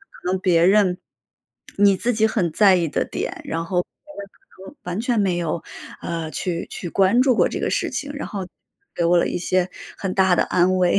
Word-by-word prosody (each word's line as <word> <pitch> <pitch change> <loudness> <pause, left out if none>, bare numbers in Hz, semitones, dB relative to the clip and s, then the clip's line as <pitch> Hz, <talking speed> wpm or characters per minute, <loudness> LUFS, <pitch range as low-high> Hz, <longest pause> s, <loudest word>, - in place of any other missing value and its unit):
可 - - -17
能 190 - 0
别 170 -3 +3
人 190 -2 +3 0.8
你 200 -1 +5
自 245 +5 0
己 220 0 +2
很 205 -6 0
在 195 +3 +5
意 170 -2 +1
的 - - -1
点， - - -5
然 165 +1 -3
后 180 +1 0
别 - - -31 0.3
人 200 - -6
可 190 - -15
能 - - -25
完 180 +3 -4
全 235 -2 0
没 185 -3 +1
有， 170 -1 -2 0.4
呃， 165 -2 -4
去 175 -2 -3
去 175 - -6
关 195 +8 +3
注 255 -3 +3
过 - - +3
这 - - -4
个 - - -1
事 - - 0
情， 285 - -4
然 285 - -5
后 190 -3 -6 0.5
给 170 - 0
我 175 +1 +4
了 170 - +2
一 - - -2
些 185 +1 0 0.3
很 190 -2 -3
大 190 -2 +3
的 - - +3
安 185 +1 +2
慰。 180 +1 +3
185 Hz, 240 characters per minute, -22 LUFS, 175-200 Hz, 0.8 s, 你